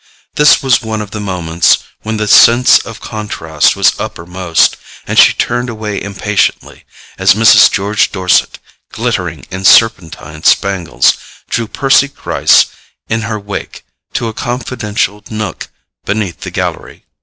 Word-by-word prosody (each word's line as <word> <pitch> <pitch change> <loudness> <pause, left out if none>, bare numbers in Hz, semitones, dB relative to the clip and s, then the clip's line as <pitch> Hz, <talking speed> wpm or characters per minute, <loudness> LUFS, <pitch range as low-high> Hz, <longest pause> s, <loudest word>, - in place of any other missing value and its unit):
This 150 -1 +4
was 130 -3 +2
one 110 -1 -4
of 105 -1 -7
the 110 - -6
moments 85 -4 +1 0.2
when 110 0 -4
the 105 0 -2
sense 120 +4 +6
of 115 -3 -9
contrast 90 -9 -1
was - - +3
uppermost, 90 0 -1 0.3
and - - -4
she - - +7
turned 120 +1 -2
away 110 -3 -5
impatiently 100 +1 -2 0.3
as 95 +1 +4
Mrs. 115 0 +6
George 100 +1 0
Dorset, 95 -2 +1 0.3
glittering - - -3
in 95 +1 -6
serpentine 80 -8 +2
spangles, 85 -11 +2 0.4
drew 115 -1 -1
Percy 135 +4 +2
Gryce 140 - +2 0.4
in 110 0 -1
her 110 -1 -3
wake 100 -1 -8 0.3
to 115 - -2
a 110 - -5
confidential 110 -4 -3
nook 110 -2 -5 0.4
beneath 100 -5 -3
the - - -7
gallery. - - -5
105 Hz, 135 wpm, -12 LUFS, 95-115 Hz, 0.4 s, she